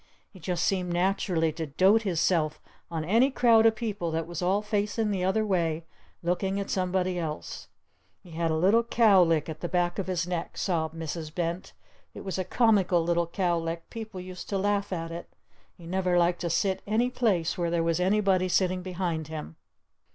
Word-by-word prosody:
He 190 - -14
just 175 0 -2
seemed 180 -2 0
naturally 175 -2 +1
to 160 0 -5
dote 190 +10 +4
hisself 170 -5 +1 0.3
on 160 -2 -3
any 230 +9 +4
crowd 230 -4 +5
of 225 - +3
people 210 -6 -3
that 160 0 -2
was 170 0 -6
all 190 +4 +1
facing 210 +1 -1
the 190 -2 -1
other 215 +4 +1
way 165 -5 0 0.4
looking 190 +3 0
at 200 - -4
somebody 185 -1 0
else! 155 -2 -5 0.6
He 175 - -14
had 165 0 -1
a 160 - +1
little 195 +8 +4
cowlick 190 -10 +4
at 155 -1 -6
the 175 - -4
back 175 0 0
of 195 - -3
his 180 -2 -1
neck!" 175 -2 -4
sobbed 160 -4 -1
Mrs. 160 -1 -5
Bent. 170 +1 -3 0.4
"It - - -7
was 190 -1 -3
a - - 0
comical 190 -4 +3
little 170 0 +1
cowlick! 170 -2 -2
People 220 -4 -7
used 180 0 -8
to 200 - 0
laugh 200 +1 0
at 165 -2 -3
it! 170 +1 -7 0.5
He 170 - -13
never 180 0 0
liked 175 0 +2
to 170 - -1
sit 190 +3 0
any 230 +4 +1
place 195 -10 +1
where 170 -1 -1
there 170 -1 +1
was 165 0 +1
anybody 190 -1 +2
sitting 185 0 +1
behind 175 -4 -3
him!" 155 - -7
180 Hz, 190 wpm, -27 LUFS, 165-195 Hz, 0.6 s, crowd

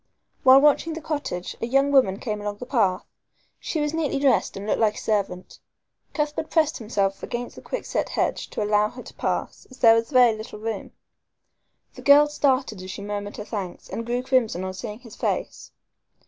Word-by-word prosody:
While 265 +1 +8
watching 300 +3 +3
the 320 - -5
cottage, 290 - -4
a 230 - -1
young 275 +3 +2
woman 255 -9 +4
came 210 -2 -4
along 205 0 -4
the 250 - -7
path. 210 -8 +1 0.5
She 320 - -3
was 295 0 -1
neatly 320 -4 0
dressed 270 -7 +2
and 195 - -6
looked 215 - 0
like 215 -2 +2
a - - -10
servant. 195 -4 -2 0.6
Cuthbert 300 +1 -2
pressed 315 0 +2
himself 200 -4 -1
against 240 0 -5
the - - -11
quickset - - -3
hedge - - -1
to - - -3
allow 210 0 +2
her - - -10
to - - -12
pass, - - -3
as 255 - -14
there 225 -2 +7
was 230 0 +1
very 250 -5 +5
little 215 0 -8
room. 220 -1 -5 1.0
The - - -11
girl 290 +1 +7
started 265 -8 0
as 185 - -8
she 200 +2 -6
murmured 205 0 -5
her 210 - -6
thanks, 195 -6 -6
and 230 - -4
grew 240 +2 -2
crimson 250 -8 +1
on 185 0 -4
seeing 210 +4 -7
his 230 -4 -12
face. - - -3
230 Hz, 195 wpm, -24 LUFS, 205-275 Hz, 1.0 s, While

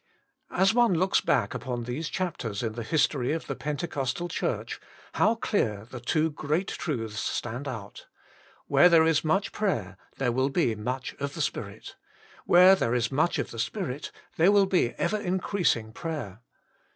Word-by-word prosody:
As 190 +3 +3
one 235 -5 +4
looks 185 +3 +2
back 105 -5 +1
upon 120 -2 -4
these 130 +7 -4
chapters 125 - -3
in 110 -2 -2
the 115 - -5
history 135 +2 +1
of 165 - -3
the - - -4
Pentecostal 145 +1 -3
Church, - - -3 0.3
how 225 - +3
clear 110 - -1
the 125 0 -8
two 155 +6 +1
great 155 +5 -1
truths 115 -9 -3
stand 120 +5 -3
out: 105 -6 -7 0.6
where 180 - +6
there 165 -2 +6
is 160 -1 +2
much 190 +6 +1
prayer 110 - -2 0.2
there 130 -3 +1
will 130 +3 +1
be 135 -5 +1
much 125 +5 -4
of 140 0 -4
the - - -7
Spirit; - - -4 0.5
where 180 +2 +8
there 125 -11 +1
is 120 0 0
much 155 +5 +1
of - - -3
the 115 - -7
Spirit 150 - -3 0.3
there 175 +5 +5
will 200 -1 +5
be 180 -11 +1
ever 215 - 0
increasing 180 - 0
prayer. 135 - -5
145 Hz, 165 wpm, -27 LUFS, 120-175 Hz, 0.6 s, where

